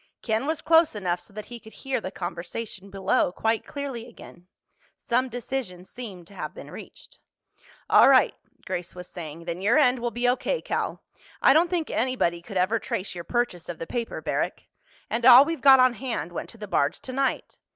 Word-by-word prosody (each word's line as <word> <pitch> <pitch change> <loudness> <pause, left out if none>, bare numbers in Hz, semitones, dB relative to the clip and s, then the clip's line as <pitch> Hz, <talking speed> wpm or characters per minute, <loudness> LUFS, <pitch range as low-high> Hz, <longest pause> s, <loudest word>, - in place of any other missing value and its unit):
Ken 225 +4 0
was 315 0 -2
close 325 -5 +4
enough 180 -4 -1
so - - -14
that 215 +1 -8
he 240 -1 -8
could 220 0 -15
hear 270 -3 -3
the 185 - -4
conversation 190 +4 -6
below 195 -2 +1
quite 225 +4 -1
clearly 270 -5 -5
again. 180 -6 -15 0.5
Some 255 +2 0
decision 240 -7 -5
seemed 200 -7 -9
to 200 - -15
have 155 -5 -6
been - - -10
reached. - - -12 0.7
"All - - +7
right," - - +5 0.3
Grace 175 0 -5
was 180 0 -8
saying, 165 -1 -8
"then 170 +1 -4
your 220 +8 +3
end 255 -4 +4
will 240 0 -1
be 240 +1 -1
O.K., 260 - 0
Cal. - - -3 0.4
I - - +6
don't 335 +3 +4
think 340 -3 -1
anybody 225 -9 0
could 190 +3 -6
ever 195 +5 +2
trace 195 -2 -4
your 175 -1 -6
purchase 240 -7 -2
of 170 - -5
the 165 - -5
paper, 235 +5 -4
Barrack. - - -2 0.4
And 235 - -2
all 255 +2 +10
we've 330 +1 -3
got 270 -2 +8
on 255 -1 +5
hand 235 - -4
went 175 - -6
to - - -11
the 210 -1 -7
barge 145 -5 +1
tonight. 265 +1 -2
225 Hz, 195 wpm, -26 LUFS, 180-255 Hz, 0.7 s, all